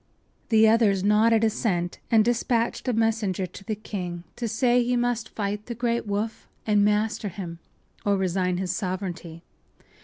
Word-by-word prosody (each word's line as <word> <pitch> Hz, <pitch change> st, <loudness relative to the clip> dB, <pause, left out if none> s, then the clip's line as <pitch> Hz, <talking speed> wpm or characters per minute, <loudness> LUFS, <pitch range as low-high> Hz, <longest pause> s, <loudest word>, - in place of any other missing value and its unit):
” -, -, -40 dB
The 220 Hz, -1 st, +6 dB
others 215 Hz, -4 st, +3 dB
nodded 220 Hz, +2 st, +4 dB
assent, 195 Hz, -6 st, 0 dB
and 220 Hz, -2 st, +5 dB
dispatched 235 Hz, +1 st, 0 dB
a 250 Hz, -, +2 dB
messenger 220 Hz, -4 st, 0 dB
to 185 Hz, +2 st, -11 dB
the 215 Hz, +1 st, -3 dB
king 180 Hz, -5 st, -5 dB
to 235 Hz, -, -3 dB
say 245 Hz, +2 st, +2 dB
he 245 Hz, +1 st, 0 dB
must 240 Hz, -2 st, 0 dB
fight 205 Hz, 0 st, -3 dB
the 235 Hz, -, -4 dB
great 235 Hz, -1 st, -1 dB
Woof 210 Hz, +2 st, -3 dB, 0.2 s
and 210 Hz, -2 st, +3 dB
master 210 Hz, +1 st, +1 dB
him 170 Hz, -3 st, -7 dB, 0.4 s
or 200 Hz, -1 st, +2 dB
resign 185 Hz, -1 st, 0 dB
his 185 Hz, -1 st, -1 dB
sovereignty. 180 Hz, -4 st, -4 dB
210 Hz, 160 wpm, -25 LUFS, 190-230 Hz, 0.4 s, The